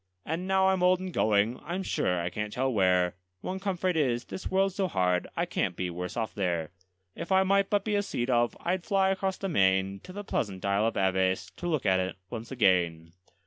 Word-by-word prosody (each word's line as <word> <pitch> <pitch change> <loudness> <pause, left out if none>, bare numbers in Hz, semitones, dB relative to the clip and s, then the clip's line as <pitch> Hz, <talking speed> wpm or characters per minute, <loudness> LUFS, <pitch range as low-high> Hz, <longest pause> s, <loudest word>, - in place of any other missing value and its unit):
And 165 +4 -3
now 190 0 +3
I'm 190 -1 +1
old 180 0 +4
and 185 -1 -6
going 110 +1 +2
I'm 180 +4 -4
sure 90 - 0
I 85 +1 -2
can't 105 +1 -4
tell 130 +2 0
where; 90 -3 +3 0.3
One 190 +1 -4
comfort 185 -2 -1
is, 125 -6 +1
this - - -6
world's 195 0 +2
so 195 -1 0
hard, 90 - +1
I - - +1
can't - - -1
be 90 -1 -3
worse 90 +4 -5
off 115 -2 -2
there: 85 -5 -1 0.4
If 170 - -6
I 190 0 +5
might 195 +1 +2
but 205 -2 +1
be 215 - -1
a 205 - +3
sea 120 -11 -2
dove, 120 -2 +1
I'd 180 +1 -1
fly 195 -1 +2
across 190 0 -1
the 195 - -3
main, 95 - +2
To 185 - -12
the 205 +2 -6
pleasant 100 - -3
Isle 100 +2 +2
of 115 - -2
Aves, 95 -1 +1
to 175 - -4
look 155 -8 -1
at 95 -2 +3
it 95 -1 -2 0.2
once 115 0 -6
again. 85 -8 +2
120 Hz, 225 wpm, -28 LUFS, -, 0.4 s, I